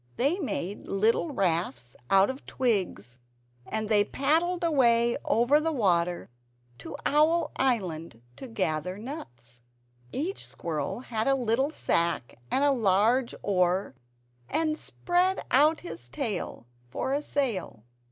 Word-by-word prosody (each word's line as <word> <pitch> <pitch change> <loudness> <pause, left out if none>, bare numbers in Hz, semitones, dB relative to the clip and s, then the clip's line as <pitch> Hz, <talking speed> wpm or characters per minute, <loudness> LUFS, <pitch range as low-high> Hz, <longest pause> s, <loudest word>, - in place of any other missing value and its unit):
They 290 +10 +1
made 205 - -4
little 220 - +1
rafts 165 - -1
out 195 +4 +5
of 265 - -11
twigs, 185 - -1 0.5
and 220 0 -2
they 210 -1 +4
paddled 330 - 0
away 235 -7 +3
over 240 +7 +4
the 325 +1 0
water 175 - 0 0.5
to - - -8
Owl 315 +3 +3
Island 180 - -1 0.2
to 265 - -8
gather 180 -5 -2
nuts. 125 - -9 0.5
Each 340 +9 -3
squirrel 155 - -4
had 225 -2 -2
a 275 - +4
little 250 +2 +1
sack 170 - 0 0.2
and 275 - +1
a 285 - +5
large 230 +2 +2
oar, 180 -3 +1 0.6
and 315 -1 +1
spread 360 +4 0
out 300 +4 +4
his 165 -8 -8
tail 205 - -4 0.2
for 265 - -2
a 285 - 0
sail. 230 - -2
230 Hz, 125 wpm, -28 LUFS, 175-280 Hz, 0.6 s, out